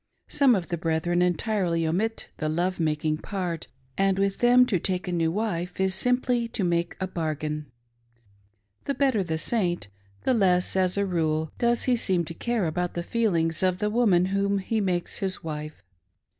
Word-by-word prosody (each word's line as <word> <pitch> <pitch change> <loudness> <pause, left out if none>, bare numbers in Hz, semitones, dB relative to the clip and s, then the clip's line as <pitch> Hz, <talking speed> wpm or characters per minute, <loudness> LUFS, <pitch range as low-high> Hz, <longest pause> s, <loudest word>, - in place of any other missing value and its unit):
Some 275 -4 +4
of 180 -4 -3
the 170 - -2
brethren 165 +2 0
entirely 180 -2 +1
omit 205 +8 -1
the 155 - -2
love 175 +4 -1
making 155 -1 0
part, 180 -5 -4 0.3
and 195 -1 +3
with 195 0 0
them 245 +1 +6
to 195 -7 0
take 185 +1 -2
a - - -2
new 165 -2 +1
wife 180 -3 -3
is 190 0 +2
simply 245 +3 +1
to 220 - -3
make 170 -1 0
a 190 - -1
bargain. 155 -4 -3 1.2
The 280 - -1
better 265 -6 +2
the 160 -2 -2
Saint, 175 - 0 0.3
the 260 - +2
less, 185 -6 +2
as 185 0 +2
a 200 - +2
rule, 160 -4 0
does 235 0 +2
he 255 -2 +3
seem 185 -7 +1
to 165 - -6
care 235 +2 -1
about 175 +2 -2
the 170 - -2
feelings 170 -7 0
of 185 -1 +2
the 210 +2 -1
woman 205 -7 +3
whom 200 0 +1
he 215 +3 -1
makes 180 -3 -1
his 190 -1 -3
wife. 155 -1 -6
180 Hz, 180 wpm, -26 LUFS, 165-210 Hz, 1.2 s, them